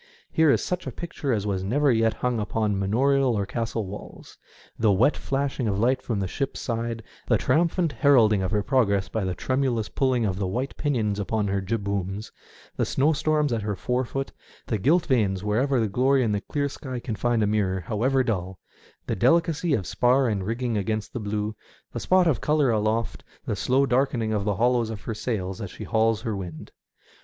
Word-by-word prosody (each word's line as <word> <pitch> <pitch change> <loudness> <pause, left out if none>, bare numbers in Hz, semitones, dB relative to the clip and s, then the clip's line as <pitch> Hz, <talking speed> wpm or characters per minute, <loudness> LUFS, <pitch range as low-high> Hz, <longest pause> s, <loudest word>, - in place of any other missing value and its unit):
Here 160 -1 +4
is - - +3
such 180 0 -3
a - - -3
picture 165 -5 -4
as 105 -4 0
was 95 -2 -1
never 140 +8 +2
yet 115 -1 +2
hung 125 -2 -1
upon 105 -1 -1
manorial 130 +5 +2
or 100 - 0
castle 115 0 -3
walls 100 +2 -10 0.2
— - - -27
the 110 -2 +4
wet 100 +10 +3
flashing 135 -2 -2
of 100 -2 0
light 125 +5 +2
from 115 -5 -2
the 95 - -1
ship's 135 +8 -3
side, 115 -1 -3 0.2
the - - +4
triumphant 165 +4 +1
heralding 115 -6 +4
of 95 - -1
her 105 0 0
progress 100 -6 +1
by 110 - -2
the 95 -1 -2
tremulous 130 -4 -1
pulling 130 -4 +1
of 95 -2 -2
the 95 - -1
white 125 +8 -3
pinions 110 -9 -1
upon 105 +1 -1
her 100 0 0
jibbooms, 100 -1 -3 0.5
the - - +1
snowstorm 150 +1 +2
at 115 - -1
her 105 0 -2
forefoot, 125 +5 -2 0.3
the 110 - -2
gilt 165 - +3
veins 105 - +1
wherever 125 +6 +1
the 110 - +1
glory 130 +5 +2
in 110 - +1
the 105 -1 -1
clear 145 +5 -2
sky 130 -2 -6
can 120 -1 -4
find 115 +2 +1
a - - +3
mirror, 100 -3 0
however 130 +8 +1
dull; 95 -6 -2 0.5
the - - -2
delicacy 165 - +2
of 95 - -3
spar 130 +5 +2
and 100 -4 -2
rigging 115 -1 -1
against 110 +2 -3
the - - -3
blue; 105 0 -3 0.4
the - - -3
spot 185 -1 +3
of 160 -6 +1
colour 150 -4 +2
aloft; 110 +1 -1 0.2
the 110 - -1
slow 130 +7 +2
darkening 125 -4 +1
of 100 -2 -1
the 105 -2 0
hollows 120 +1 +2
of 110 -3 -6
her 115 - -4
sails 105 -4 -3
as 100 - -5
she - - -9
hauls 110 -1 +1
her 110 -4 -2
wind. 90 -5 -7
115 Hz, 200 wpm, -25 LUFS, 105-135 Hz, 0.5 s, Here